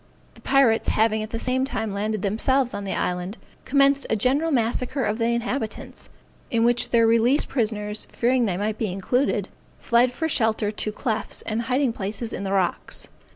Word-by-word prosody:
The - - -18
pirates, 265 -5 +3
having 220 0 +2
at 215 - -5
the 230 - -4
same 255 +2 0
time 225 -6 -3
landed 210 0 -2
themselves 245 +5 +1
on 200 0 -5
the 195 - -2
island, 180 +4 -2 0.3
commenced 275 0 +3
a - - +2
general 265 +9 +2
massacre 250 +1 0
of 215 +1 -1
the 230 - +1
inhabitants, 235 0 -3 0.4
in 230 -3 +1
which 240 0 +2
their 230 -1 +4
released 230 +5 +3
prisoners, 210 -4 -1
fearing 245 0 +1
they 180 -3 -1
might 210 +2 -2
be 215 -5 -1
included, 245 +9 0 0.3
fled 240 +1 +3
for 320 +6 -2
shelter 220 -7 +1
to 215 0 -2
clefts 220 0 -3
and 225 +1 -2
hiding 255 +1 0
places 215 +2 -3
in - - -4
the 195 - -3
rocks. 190 -3 -1
230 Hz, 180 wpm, -24 LUFS, 210-255 Hz, 0.4 s, their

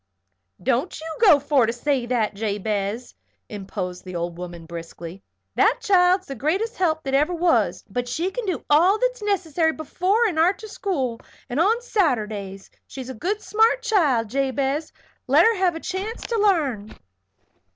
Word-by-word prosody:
"Don't 265 +8 0
you 320 - -8
go 370 -10 +7
for 280 -4 +2
to - - +1
say 245 +1 -1
that, 235 -4 0
Jabez," 210 +2 -3 0.3
interposed 190 -3 -6
the 185 -2 -8
old 170 0 -3
woman, 175 -1 -8
briskly. 170 +2 -9 0.3
"That - - +3
child's 375 -4 +3
the 275 - -6
greatest 360 - -1
help 320 -4 0
that 270 - -4
ever 300 +6 +2
was; 340 0 +1
but 245 0 -3
she 335 +9 -2
can 480 0 -5
do 365 - -3
all 350 +8 +5
that's - - -1
necessary 345 -6 0
before 370 +9 0
and 355 -8 0
arter 385 +6 +2
school, 270 - -3 0.3
and 255 - -1
on 445 +8 +2
Saturdays. 215 - -1 0.2
She's 260 -1 -8
a - - -6
good 380 - -3
smart 450 +3 +2
child, 290 - +2
Jabez. 275 +3 -1 0.4
Let - - +5
her 455 0 +4
have 365 -3 +1
a - - -4
chance 385 +7 -5
to 470 - -3
l'arn." 285 - +1
300 Hz, 160 wpm, -23 LUFS, 225-380 Hz, 0.4 s, go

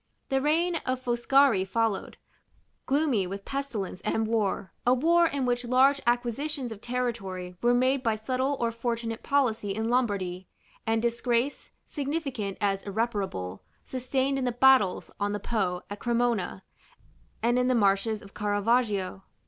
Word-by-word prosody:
The 270 0 +1
reign 330 +4 +2
of 255 -4 -2
Foscari 245 -3 +3
followed, 215 +1 -1 0.7
gloomy 270 -9 +2
with 195 +2 -6
pestilence 235 -10 -4
and 225 - 0
war; 215 -3 -1
a 250 +1 +4
war 335 +5 +4
in 280 -4 -1
which 245 0 0
large 265 +3 +4
acquisitions 245 +2 -1
of 215 -2 -8
territory 220 -8 -3
were 240 +1 +4
made 260 +2 +2
by 225 -3 +1
subtle 255 +5 -1
or 235 -1 +1
fortunate 230 0 -3
policy 225 -8 +1
in 220 +1 -1
Lombardy, 195 -7 0 0.4
and 225 0 +1
disgrace, 235 +3 0 0.2
significant 275 - -3
as 200 -2 0
irreparable, 195 - -3 0.2
sustained 265 +1 -1
in 260 - -1
the 245 - +1
battles 245 -6 +4
on 205 0 0
the 205 - -2
Po 185 -5 -1
at 205 0 -7
Cremona, 235 -6 0 0.8
and 240 +2 +3
in 250 - +2
the 255 - +3
marshes 205 0 +2
of 195 - -14
Caravaggio. 205 -2 0
235 Hz, 145 wpm, -28 LUFS, 205-260 Hz, 0.8 s, a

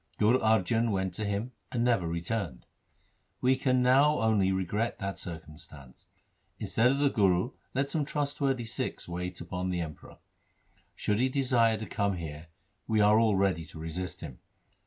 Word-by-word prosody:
Guru 115 +5 +4
Arjan 110 +1 +2
went 95 -3 -1
to 105 +4 -3
him 105 +5 -2 0.2
and 120 -2 0
never 115 -8 +2
re 85 0 -3
turned. 85 - -3 0.7
We 130 +1 +3
can 130 -1 +2
now 140 +4 +5
only 105 -4 +3
regret 95 +5 -1
that 100 -1 -4
circumstance. 75 -5 -10 0.5
Instead 115 +2 +2
of 135 +2 +2
the 140 -1 +2
Guru 95 +2 +2 0.2
let 140 +1 0
some 155 0 0
trustworthy 140 -4 -1
Sikhs 115 - -3
wait 90 +1 -5
on 90 0 -2
the 90 -1 -1
Emperor. 80 -2 -8 0.8
Should 105 0 0
he 130 +2 +2
desire 125 -4 +2
to 110 - -5
come 100 -3 -1
here, 80 -1 -7 0.4
we 110 -1 +2
are 105 +1 +6
all 110 -3 +3
ready 95 -4 +1
to 80 - -12
resist 90 +3 -5
him. 70 -7 -8
105 Hz, 165 wpm, -29 LUFS, 90-120 Hz, 0.8 s, are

